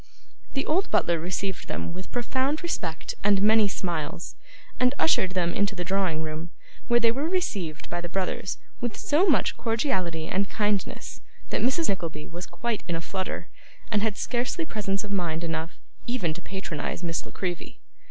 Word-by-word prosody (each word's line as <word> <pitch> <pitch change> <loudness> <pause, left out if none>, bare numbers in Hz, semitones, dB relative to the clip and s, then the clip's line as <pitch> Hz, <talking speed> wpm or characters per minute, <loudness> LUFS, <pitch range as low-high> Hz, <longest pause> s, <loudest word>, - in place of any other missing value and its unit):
The 275 - +1
old 365 +6 +2
butler 170 -1 +3
received 185 +2 -2
them - - -3
with 185 +1 -7
profound 260 +5 0
respect 170 - -2
and 200 -1 +5
many 215 +1 +6
smiles, 170 -4 -2 0.5
and 250 +2 +4
ushered 190 - +4
them 175 -2 +2
into 200 0 +1
the 180 - -2
drawing 180 -4 +1
room, 155 +2 -4 0.4
where 240 0 +5
they 230 -1 +5
were 280 +7 0
received 200 - -1
by 175 0 -2
the 175 - -4
brothers 190 0 -1 0.2
with 240 -2 -2
so 320 +7 +4
much 310 - +4
cordiality 190 - +1
and 195 +3 +1
kindness 210 -2 -1 0.3
that - - +1
Mrs. 295 +7 +3
Nickleby 165 -6 -2
was 175 +2 -6
quite 235 -2 -2
in 170 - 0
a - - 0
flutter, 185 +3 -3 0.4
and 210 - +3
had 215 -1 +1
scarcely 250 +7 0
presence 200 -5 -1
of 210 - -6
mind 170 -4 0
enough, 165 0 -2 0.3
even 235 -10 +1
to 180 - -8
patronise 185 -3 -4
Miss 165 -1 -1
La - - -11
Creevy. 180 -2 -4
195 Hz, 170 wpm, -27 LUFS, 170-235 Hz, 0.5 s, many